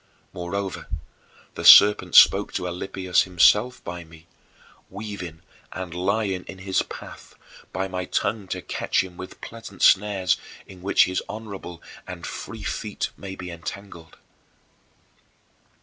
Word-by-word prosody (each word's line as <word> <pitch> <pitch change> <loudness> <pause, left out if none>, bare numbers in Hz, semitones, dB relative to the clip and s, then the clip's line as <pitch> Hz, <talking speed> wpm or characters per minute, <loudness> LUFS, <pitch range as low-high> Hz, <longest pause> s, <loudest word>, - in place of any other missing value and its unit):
Moreover, 95 +2 -4 0.7
the - - -7
serpent 105 0 +8
spoke - - +7
to 90 - -2
Alypius 90 +1 0
himself 105 +7 +3
by 85 0 -6
me, 80 0 -17 0.6
weaving 95 -5 -7 0.3
and 90 -2 -6
lying 95 +1 -1
in 95 - -9
his 95 0 0
path, - - -10 0.4
by 95 +1 -2
my 90 -1 -4
tongue 100 +1 -1
to 90 0 -5
catch 95 - 0
him 90 -2 -11
with 95 +1 -10
pleasant 110 -4 -8
snares 95 -2 +4 0.3
in 95 -2 -14
which 95 - +4
his 95 0 -2
honorable 100 -6 -8 0.2
and - - -7
free - - -7
feet - - -3
might 95 -1 -8
be 90 -1 -7
entangled. 85 0 -9
95 Hz, 130 wpm, -24 LUFS, 90-100 Hz, 0.7 s, serpent